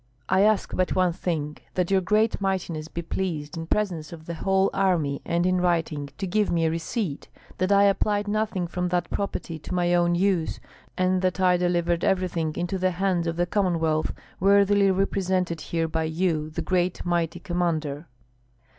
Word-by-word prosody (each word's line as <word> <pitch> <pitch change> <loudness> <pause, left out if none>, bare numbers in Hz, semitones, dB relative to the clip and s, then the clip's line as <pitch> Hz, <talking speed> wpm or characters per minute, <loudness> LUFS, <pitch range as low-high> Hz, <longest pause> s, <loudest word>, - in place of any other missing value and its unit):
"I 190 - +3
ask 210 0 +2
but 185 0 0
one 185 -2 +2
thing, 155 -4 -3 0.2
that 180 0 0
your 190 -1 +4
great 215 +4 +1
mightiness 180 -5 -2
be 170 +1 -5
pleased, 165 -3 -3
in 165 0 -5
presence 175 -8 -1
of 160 -2 -10
the 170 - -5
whole 190 +3 +1
army 175 -8 +1
and 170 0 +1
in 185 0 +2
writing, 160 -5 0
to 200 - -3
give 205 +3 +1
me 165 -1 +1
a 160 - +2
receipt, 165 - -3 0.3
that 185 +2 +1
I 200 0 +6
applied 205 +1 +2
nothing 205 -3 -1
from 180 +1 -2
that 175 -1 -1
property 175 -5 -3
to 170 +5 -5
my 175 0 +2
own 175 0 +3
use, 180 -3 +1 0.4
and 185 0 +2
that 185 0 0
I 180 -1 +4
delivered 175 -1 +1
everything 175 -5 0
into 175 +2 -2
the 185 0 +2
hands 185 -3 +1
of 165 - -1
the 175 +1 +1
Commonwealth, 165 -5 0 0.3
worthily 200 +1 +4
represented 185 -3 0
here 165 -1 -1
by 160 0 -1
you, 160 -1 0
the 155 - -4
great 180 -1 0
mighty 175 -1 0
commander." 165 -4 -2
175 Hz, 180 wpm, -25 LUFS, 165-190 Hz, 0.4 s, I